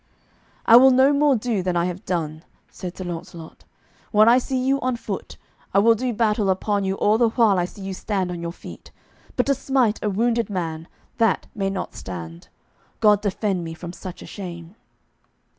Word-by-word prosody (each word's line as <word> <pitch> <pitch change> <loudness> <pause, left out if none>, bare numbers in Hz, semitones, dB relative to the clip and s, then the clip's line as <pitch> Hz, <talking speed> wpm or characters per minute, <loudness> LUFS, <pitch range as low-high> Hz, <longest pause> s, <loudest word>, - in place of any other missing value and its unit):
"I 230 - +9
will 265 +2 +8
no 265 +2 +5
more 285 -1 +3
do 225 -3 -1
than 180 -1 -1
I 170 - +2
have 180 +1 -5
done," 160 -3 -3 0.3
said 180 -1 -8
Sir 185 - -5
Launcelot. 170 -2 -8 0.4
"When 215 0 +5
I 240 +2 +6
see 260 +1 -3
you 270 +2 +1
on 255 -1 0
foot 210 -4 -6 0.4
I - - +5
will 225 +3 +6
do 250 +3 -2
battle 215 -3 +1
upon 200 +2 0
you 190 0 -1
all 210 +3 +2
the 235 -2 +4
while 220 -5 +3
I 175 - +1
see 195 +2 -11
you 190 0 -4
stand 190 -2 -2
on 175 -1 -5
your 170 0 -4
feet; - - -12 0.5
but - - +1
to 275 - +3
smite 265 -5 0
a 210 - +1
wounded 230 +3 0
man, 165 -4 -4 0.3
that 225 -4 +2
may 195 -2 -1
not 195 -1 -4
stand, 85 -2 -8 0.5
God 210 -2 +4
defend 195 -2 -1
me 165 0 -6
from 175 +1 -8
such 185 -1 -9
a - - -10
shame." 170 -3 -8
200 Hz, 195 wpm, -23 LUFS, 175-230 Hz, 0.5 s, I